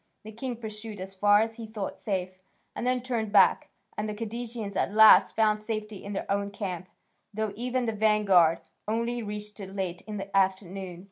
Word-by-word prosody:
The 220 - -9
king 245 +3 -4
pursued 215 -2 -7
as 190 +1 -6
far 205 +2 +5
as 225 +1 -2
he 230 -1 -7
thought 215 -3 -5
safe, 185 -3 -2 0.4
and 245 - -3
then 250 -1 +1
turned 230 -4 -2
back, 205 - +5 0.3
and 215 +1 -3
the 210 - -4
Cadousians 225 -1 -5
at - - 0
last 220 +1 +7
found 215 -1 +3
safety 215 -1 -5
in 200 - -6
their 195 - -3
own 200 0 0
camp, 185 -3 -5 0.4
though 215 0 -2
even 250 +2 -1
the 225 - -1
vanguard 205 -6 +4 0.3
only 235 +2 -1
reached 210 0 -7
it 195 -1 -8
late 185 -3 -3
in 210 -1 -5
the 195 0 -6
afternoon. 190 -2 0
210 Hz, 190 wpm, -28 LUFS, 195-225 Hz, 0.4 s, last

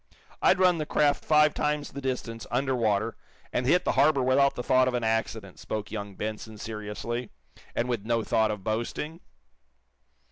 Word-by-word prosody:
"I'd 185 - +5
run 180 -2 +4
the 155 - -3
craft 145 -1 +2
five 150 -1 +4
times 150 0 -1
the 140 - -7
distance, 125 -4 -4
under 130 +2 0
water, 110 -1 +1 0.4
and 125 - 0
hit 180 +5 +3
the - - +2
harbor 140 -3 +3
without 135 +2 +3
thought 130 +1 +3
of 125 - 0
an 120 - -1
accident," 110 -3 -2
spoke 105 -2 -5
young 100 -2 -5
Benson, 110 +1 -5
seriously, 110 +2 -5 0.5
and 120 - 0
with 120 -5 -2
no 115 0 0
thought 110 0 +2
of 105 -3 -4
boasting. 120 - -3
120 Hz, 170 wpm, -27 LUFS, 110-140 Hz, 0.5 s, I'd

